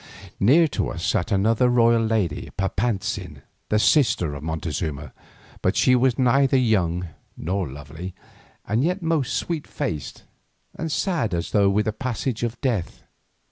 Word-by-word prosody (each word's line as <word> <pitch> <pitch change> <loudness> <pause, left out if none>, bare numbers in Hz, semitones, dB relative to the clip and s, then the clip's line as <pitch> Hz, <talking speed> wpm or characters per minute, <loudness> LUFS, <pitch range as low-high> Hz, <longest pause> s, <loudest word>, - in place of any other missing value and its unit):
Near 150 +11 +5
to - - -2
us 85 0 -4
sat 110 -1 0
another 110 +5 +3
royal 115 -1 +4
lady, 110 -8 -1
Papantzin, 100 +1 -2 0.3
the 105 - +2
sister 105 - +3
of 70 - -7
Montezuma, 80 -1 -4 0.5
but - - +1
she 130 - +4
was 125 -1 +2
neither 135 +1 +3
young 90 -8 +1 0.3
nor 90 0 -2
lovely, 75 +7 -8 0.5
and 110 +5 +1
yet 180 +3 -1
most 160 -6 0
sweet 165 -4 -3
faced 115 - -4 0.5
and 165 -1 -4
sad 150 - 0
as 85 0 -3
though 100 -2 +4
with 105 +2 +1
the 110 - -1
presage 125 0 -3
of 120 0 -3
death. 115 - -2
110 Hz, 145 wpm, -23 LUFS, 90-130 Hz, 0.5 s, Near